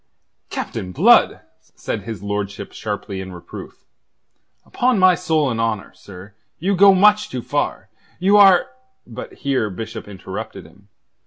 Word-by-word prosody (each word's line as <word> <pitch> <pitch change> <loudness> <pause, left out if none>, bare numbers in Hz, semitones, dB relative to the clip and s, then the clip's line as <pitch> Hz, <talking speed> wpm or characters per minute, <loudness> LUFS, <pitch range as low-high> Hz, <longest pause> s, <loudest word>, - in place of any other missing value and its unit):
"Captain 90 - -5
Blood!" - - +4 0.3
said - - -4
his 110 0 -7
lordship 100 -1 -4
sharply 100 -2 -5
in 95 0 -8
reproof. 90 -1 -11 0.8
"Upon 250 -2 +1
my 185 -1 +6
soul 160 -6 0
and 115 0 -2
honour, 110 -3 -2
sir, 100 +1 -13 0.2
you 195 +4 0
go 195 +1 +7
much 210 +2 +4
too 125 -2 -5
far. - - -2 0.3
You 195 +3 +3
are...." 195 -3 +7 0.4
But 115 - -9
here 130 -6 -1
Bishop 110 +3 -7
interrupted 100 -2 -8
him. 100 +1 -20
115 Hz, 140 wpm, -20 LUFS, -, 0.8 s, go